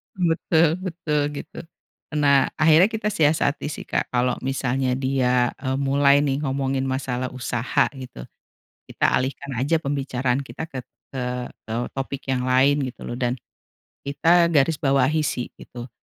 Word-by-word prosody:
Betul 165 Hz, -2 st, +2 dB
betul, 165 Hz, -5 st, -2 dB
gitu. -, -, -8 dB, 0.6 s
Nah, 140 Hz, -2 st, +4 dB
akhirnya 160 Hz, +3 st, +5 dB
kita 220 Hz, -1 st, -2 dB
siasati 150 Hz, -4 st, +1 dB
sih 150 Hz, -, -6 dB
Kak -, -, -2 dB
kalau 125 Hz, 0 st, +1 dB
misalnya 130 Hz, -1 st, -1 dB
dia, 125 Hz, -2 st, +1 dB
eee, 130 Hz, -1 st, -2 dB
mulai 140 Hz, +1 st, +3 dB
nih 140 Hz, -1 st, 0 dB
ngomongin 135 Hz, -1 st, -1 dB
masalah 130 Hz, -1 st, -2 dB
usaha 125 Hz, -1 st, 0 dB
gitu, 130 Hz, -, -9 dB, 0.6 s
kita -, -, -1 dB
alihkan 135 Hz, +2 st, -4 dB
aja 145 Hz, +6 st, +1 dB
pembicaraan 135 Hz, -2 st, -1 dB
kita 140 Hz, +3 st, -7 dB
ket 130 Hz, -2 st, -7 dB, 0.2 s
eee, 125 Hz, -1 st, -4 dB, 0.2 s
eee, 115 Hz, +2 st, -2 dB
topik 135 Hz, 0 st, -5 dB
yang 125 Hz, 0 st, -1 dB
lain 135 Hz, +3 st, +4 dB
gitu 125 Hz, -, -9 dB
loh 120 Hz, -, -5 dB
dan 125 Hz, 0 st, 0 dB, 0.7 s
kita 170 Hz, +5 st, +3 dB
garis 150 Hz, +1 st, +3 dB
bawahi 140 Hz, +2 st, +2 dB
sih, 125 Hz, -3 st, -2 dB
gitu. 120 Hz, +1 st, -10 dB
135 Hz, 140 wpm, -23 LUFS, 130-150 Hz, 0.7 s, akhirnya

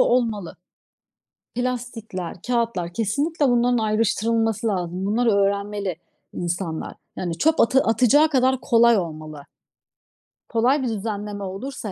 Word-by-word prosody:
olmalı. 225 Hz, -7 st, +1 dB, 1.0 s
Plastikler, 240 Hz, -7 st, -4 dB
kağıtlar, 230 Hz, -8 st, -1 dB
kesinlikle 285 Hz, -, 0 dB
bunların 245 Hz, 0 st, +3 dB
ayrıştırılması 225 Hz, +1 st, +1 dB
lazım. 180 Hz, -2 st, -2 dB
Bunları 230 Hz, +3 st, +2 dB
öğrenmeli 200 Hz, -1 st, 0 dB, 0.4 s
insanlar. 175 Hz, -2 st, -3 dB, 0.2 s
Yani, 170 Hz, -2 st, -3 dB
çöp 320 Hz, -, +3 dB
atı 260 Hz, +3 st, +4 dB
atacağı 255 Hz, +7 st, +4 dB
kadar 260 Hz, -2 st, +2 dB
kolay 235 Hz, 0 st, +5 dB
olmalı. 155 Hz, -4 st, -5 dB, 1.0 s
Kolay 245 Hz, +5 st, +2 dB
bir -, -, 0 dB
düzenleme 205 Hz, -1 st, -4 dB
olursa 205 Hz, +3 st, -5 dB
225 Hz, 105 wpm, -23 LUFS, 195-245 Hz, 1.0 s, kolay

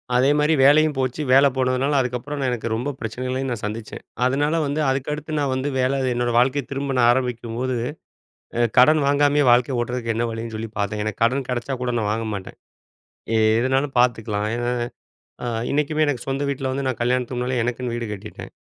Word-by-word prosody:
அதேமாரி, 145 Hz, +4 st, +3 dB
வேலையும் 150 Hz, +2 st, +5 dB
போச்சு, 130 Hz, +3 st, -1 dB
வேல 135 Hz, +2 st, +7 dB
போனதுனால 130 Hz, +2 st, +1 dB
அதுக்கப்புறம் 125 Hz, +4 st, -4 dB
நான் 130 Hz, -2 st, 0 dB
எனக்கு 120 Hz, -1 st, -3 dB
ரொம்ப 125 Hz, +6 st, -2 dB
பிரச்சனைகளயும் 130 Hz, +3 st, -3 dB
நான் 115 Hz, -2 st, -4 dB
சந்திச்சேன். 110 Hz, +1 st, -6 dB, 0.2 s
அதனால 145 Hz, +5 st, +1 dB
வந்து 145 Hz, +2 st, -2 dB
அதுக்கடுத்து 150 Hz, +3 st, -3 dB
நான் 140 Hz, -2 st, 0 dB
வந்து 130 Hz, +2 st, -1 dB
வேல 130 Hz, +2 st, +1 dB
என்னோட 120 Hz, 0 st, 0 dB
வாழ்க்கைய 135 Hz, +3 st, +3 dB
திரும்ப 135 Hz, 0 st, -2 dB
நான் 120 Hz, 0 st, +5 dB
ஆரம்பிக்கும்போது, 125 Hz, 0 st, -2 dB, 0.8 s
அ -, -, +1 dB, 0.2 s
கடன் 155 Hz, +5 st, +6 dB
வாங்காமயே 145 Hz, 0 st, +3 dB
வாழ்க்கைய 120 Hz, +1 st, +3 dB
ஓட்றதுக்கு 120 Hz, -1 st, -2 dB
என்ன 115 Hz, +1 st, 0 dB
வழின்னு 115 Hz, 0 st, -5 dB
சொல்லி 110 Hz, +1 st, -5 dB
பாத்தேன். 105 Hz, +1 st, -1 dB
எனக்கு 110 Hz, +1 st, -3 dB
கடன் 130 Hz, +2 st, +1 dB
கெடச்சா 125 Hz, +2 st, -2 dB
கூட 125 Hz, -1 st, -1 dB
நான் 105 Hz, -1 st, -1 dB
வாங்க 115 Hz, +1 st, -2 dB
மாட்டேன். 95 Hz, -1 st, -7 dB, 1.0 s
எதுனாலும் 135 Hz, +2 st, 0 dB
பாத்துக்கலாம். 110 Hz, -4 st, +1 dB
ஏனா, 120 Hz, 0 st, -1 dB, 0.7 s
அ -, -, -2 dB, 0.2 s
இன்னைக்குமே 150 Hz, +2 st, +1 dB
எனக்கு 135 Hz, -5 st, -2 dB
சொந்த 135 Hz, +1 st, -1 dB
வீட்ல 135 Hz, -1 st, -2 dB
வந்து 135 Hz, 0 st, -2 dB
நான் 130 Hz, -, -3 dB
கல்யாணத்து 125 Hz, 0 st, 0 dB
முன்னாலே 125 Hz, 0 st, -1 dB
எனக்குன்னு 120 Hz, 0 st, -3 dB
வீடு 120 Hz, -1 st, -3 dB
கட்டிட்டேன். 100 Hz, -, -9 dB
130 Hz, 175 wpm, -22 LUFS, 120-140 Hz, 1.0 s, வேல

